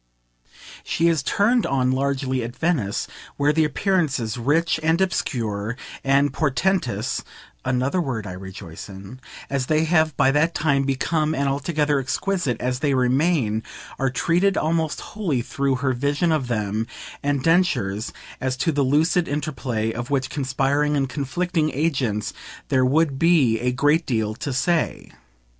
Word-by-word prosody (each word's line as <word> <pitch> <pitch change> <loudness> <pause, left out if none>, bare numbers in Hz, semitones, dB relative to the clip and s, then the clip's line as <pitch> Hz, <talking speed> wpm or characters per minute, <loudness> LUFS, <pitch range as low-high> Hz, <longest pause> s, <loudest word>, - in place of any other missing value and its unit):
She 165 - +1
is 160 -3 +1
turned 220 - +2
on 130 -2 +1
largely 130 -1 0
at 120 +1 -6
Venice, 145 - 0 0.3
where 145 +1 +3
the 160 +1 +3
appearances, 150 - 0
rich 150 +7 +1
and 165 +2 +2
obscure 115 - -1 0.3
and 140 +1 +3
portentous 140 - 0 0.4
(another 130 +7 0
word 125 - -3
I 95 - -5
rejoice 95 -1 -9
in) 100 +6 -10 0.3
as 135 -2 -2
they 155 0 +2
have 160 -3 +2
by 135 - +4
that 155 +4 +2
time 140 -3 +2
become 155 +3 0
and 140 0 0
altogether 145 +1 +1
exquisite 140 - -1
as 125 0 -1
they 140 -1 +1
remain, 130 -3 +2 0.4
are 135 - +2
treated 175 +9 +1
almost 160 -1 0
wholly 170 - -1
through 140 +1 0
her 130 +1 0
vision 145 +6 0
of 150 -5 0
them 110 -1 -1 0.3
and 140 -2 0
Densher's 145 - +1 0.3
(as 130 -1 -1
to 165 +6 +1
the 145 -1 0
lucid 155 +6 +2
interplay 130 -7 -2
of 120 +2 -5
which 135 -2 0
conspiring 140 +2 +1
and 135 -1 +1
conflicting 155 +4 -1
agents 130 -9 0 0.4
there 130 -1 +3
would 140 +1 +2
be 150 -10 +4
a 125 +1 0
great 145 +6 +2
deal 110 -4 0
to 140 +5 -5
say). 155 +6 0
140 Hz, 150 wpm, -23 LUFS, 125-160 Hz, 0.4 s, by